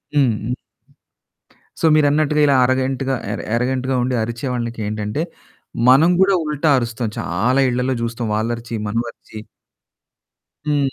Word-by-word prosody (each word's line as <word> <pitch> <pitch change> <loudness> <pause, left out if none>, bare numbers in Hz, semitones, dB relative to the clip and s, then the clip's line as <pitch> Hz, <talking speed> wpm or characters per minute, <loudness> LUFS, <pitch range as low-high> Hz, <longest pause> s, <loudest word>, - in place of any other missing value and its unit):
హ్మ్. 120 -4 +1 1.3
సో, - - -4
మీరన్నట్టుగా 150 0 +3
ఇలా 140 -2 +4
అరోగెంట్‌గా, 130 +1 0 0.4
ఎరోగెంట్‌గా 130 +2 0
ఉండి 125 +1 -1
అరిచే 115 +3 -4
వాళ్ళకేంటంటే, 110 +1 -3 0.7
మనం 145 +7 +6
కూడా 195 +1 +5
ఉల్టా 150 +1 +1
అరుస్తాం. 120 -1 -3
చాలా 120 +10 +1
ఇళ్ళలో 125 +2 0
చూస్తాం. 115 0 -3
వాళ్ళు 110 +2 -1
అరిచి, 115 0 -8
మనం 115 +3 0
అరిచి 110 - -13 1.3
హ్మ్. 140 -2 +1
125 Hz, 115 wpm, -20 LUFS, 115-140 Hz, 1.3 s, మనం